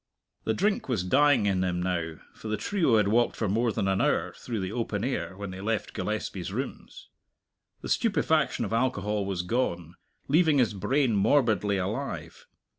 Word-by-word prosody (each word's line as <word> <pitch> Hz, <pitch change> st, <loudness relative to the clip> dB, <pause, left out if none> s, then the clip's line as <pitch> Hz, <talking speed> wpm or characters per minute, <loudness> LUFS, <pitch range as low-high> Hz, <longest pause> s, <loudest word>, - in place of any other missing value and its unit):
The 110 Hz, -, +1 dB
drink 200 Hz, -5 st, 0 dB
was 110 Hz, -8 st, 0 dB
dying 140 Hz, +4 st, +4 dB
in 95 Hz, -2 st, +1 dB
him 90 Hz, -1 st, -1 dB
now, 85 Hz, -3 st, -2 dB, 0.2 s
for -, -, -10 dB
the 110 Hz, 0 st, -1 dB
trio 165 Hz, -, +2 dB
had 105 Hz, -2 st, +3 dB
walked 120 Hz, +3 st, +2 dB
for 110 Hz, -, -1 dB
more 115 Hz, +4 st, +1 dB
than 100 Hz, -, -1 dB
an 95 Hz, 0 st, +1 dB
hour -, -, +1 dB
through 115 Hz, -3 st, -5 dB
the 95 Hz, 0 st, -3 dB
open 110 Hz, -3 st, -2 dB
air 125 Hz, -7 st, -3 dB
when 100 Hz, -1 st, -5 dB
they 95 Hz, 0 st, -7 dB
left 110 Hz, +1 st, -2 dB
Gillespie's 95 Hz, -4 st, -3 dB
rooms. 140 Hz, -, -6 dB, 0.7 s
The -, -, -6 dB
stupefaction 160 Hz, -, +1 dB
of 110 Hz, -, -4 dB
alcohol 105 Hz, -4 st, 0 dB
was 95 Hz, -2 st, -2 dB
gone, 90 Hz, -6 st, -1 dB, 0.3 s
leaving 155 Hz, 0 st, +4 dB
his 125 Hz, -5 st, +3 dB
brain 130 Hz, +5 st, +1 dB
morbidly 105 Hz, -2 st, +2 dB
alive. 110 Hz, +9 st, -4 dB
110 Hz, 175 wpm, -27 LUFS, 95-130 Hz, 0.7 s, dying